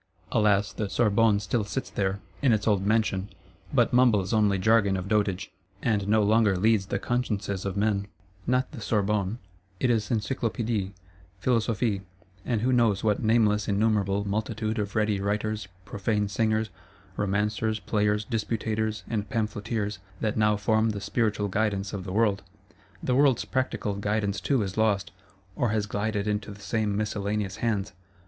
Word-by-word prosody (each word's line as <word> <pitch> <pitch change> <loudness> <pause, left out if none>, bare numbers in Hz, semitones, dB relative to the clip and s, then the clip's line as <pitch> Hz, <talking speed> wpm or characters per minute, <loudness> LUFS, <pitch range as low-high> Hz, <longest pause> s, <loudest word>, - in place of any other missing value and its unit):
Alas, 105 -2 +2
the 105 -1 -3
Sorbonne 110 -1 +3
still 105 +3 -1
sits 95 -2 -4
there, 95 0 -1 0.2
in 130 -5 +4
its 105 0 0
old 100 -3 +3
mansion; 105 -2 +1 0.4
but - - +2
mumbles 115 -6 +4
only 105 -3 +3
jargon 100 0 +3
of 90 +1 -5
dotage, 100 -3 0 0.3
and 105 -4 +1
no 110 0 +4
longer 105 -2 +3
leads 105 0 +2
the 100 - -1
consciences 105 -4 -2
of 100 0 -3
men: 100 -1 +1 0.4
not 125 +1 +1
the 140 -7 -8
Sorbonne; 105 0 0 0.4
it 125 - +2
is 110 -3 0
Encyclopédies, 115 -2 -1 0.5
Philosophie, 115 -1 0 0.4
and 115 -2 -1
who 130 +2 +2
knows 115 -5 +3
what 105 -2 +1
nameless 110 -2 +3
innumerable 100 -1 +1
multitude 110 +2 -2
of 105 -1 -3
ready 105 -2 +1
Writers, 105 0 -1 0.2
profane 105 +1 -1
Singers, 110 +1 0 0.4
Romancers, 105 +2 0
Players, 105 0 0
Disputators, 110 -2 -2
and 105 -2 -2
Pamphleteers, 105 -3 -2 0.2
that 110 -2 -1
now 105 -1 +3
form 110 +1 +2
the 105 -2 -3
Spiritual 105 +1 0
Guidance 100 0 -1
of 95 -2 -4
the 95 - -5
world. 100 -1 +2 0.6
The 125 - +1
world's 135 -2 +3
Practical 130 -5 -1
Guidance 100 0 -1
too 135 -6 +1
is 95 0 -5
lost, 100 -6 +1 0.4
or 120 - +1
has 105 -1 0
glided 105 0 -2
into 105 0 -2
the 105 0 -10
same 105 0 -1
miscellaneous 105 -1 -2
hands. 105 -4 -1
105 Hz, 155 wpm, -27 LUFS, 100-110 Hz, 0.6 s, in